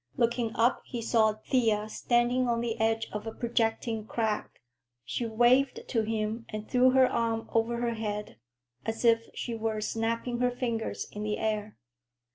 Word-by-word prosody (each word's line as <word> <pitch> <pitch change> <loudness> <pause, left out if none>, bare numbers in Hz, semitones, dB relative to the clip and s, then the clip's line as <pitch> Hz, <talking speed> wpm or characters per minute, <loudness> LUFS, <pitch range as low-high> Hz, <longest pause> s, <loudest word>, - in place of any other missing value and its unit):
Looking 235 -1 +1
up, 235 +2 +3
he 240 - -5
saw 220 -1 +3
Thea 215 -1 +1
standing 240 +3 +1
on 235 -1 +1
the 235 -2 -2
edge 225 0 +1
of 210 +1 -4
a - - -2
projecting 225 -2 -1
crag. 220 -2 -1 0.6
She 235 - -2
waved 245 +4 +3
to 230 - +2
him 220 +1 -2
and 215 0 -6
threw 255 +1 +5
her 260 0 +6
arm 225 -2 -1
over 230 +1 +1
her 235 -1 0
head, 210 -2 -4 0.5
as 225 +2 -3
if 230 0 +4
she 240 - -4
were 220 -1 -2
snapping 230 +2 -1
her 250 0 +3
fingers 240 -3 -2
in 210 - -6
the 210 0 -1
air. 215 -1 -2
225 Hz, 165 wpm, -29 LUFS, 220-240 Hz, 0.6 s, her